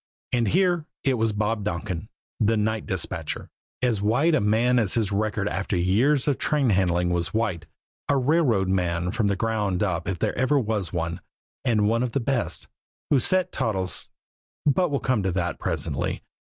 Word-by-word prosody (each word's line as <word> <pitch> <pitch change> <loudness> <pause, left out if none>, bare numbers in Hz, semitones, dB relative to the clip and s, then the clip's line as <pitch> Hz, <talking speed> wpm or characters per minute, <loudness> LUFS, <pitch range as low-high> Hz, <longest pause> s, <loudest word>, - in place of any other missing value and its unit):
And 120 -3 +1
here, 175 - +2 0.2
it 135 - +2
was 110 0 +2
Bob 105 +1 -1
Donkin, 95 0 -3 0.3
the 110 0 +3
night 110 +1 -1
dispatcher, 95 -3 -4 0.3
as 115 -5 +1
white 125 +11 +3
a 155 - +3
man 115 +4 +3
as 105 -5 +1
his 110 -4 0
record 105 0 0
after 95 -1 -1
years 120 +12 +2
of 145 - +1
train 140 -6 +2
handling 90 -2 +2
was 85 +3 -1
white, 110 -7 -1 0.4
a 140 - +4
railroad 130 - +2
man 90 -2 0
from 110 -2 0
the 100 - +1
ground 105 -3 0
up 90 -4 -1
if 95 -2 -1
there - - -1
ever 130 +3 +2
was 110 -7 -1
one, 85 -1 -3 0.4
and 110 -5 +2
one 115 +2 +2
of 125 -2 -2
the - - +1
best, 125 -1 -2 0.4
who 140 - +5
set 185 +7 +1
Toddles 95 -8 -2 0.6
but 175 +5 +3
we'll 140 -2 0
come 130 -5 +1
to 95 -1 0
that 90 -1 -2
presently. - - -2
110 Hz, 180 wpm, -25 LUFS, 95-125 Hz, 0.6 s, who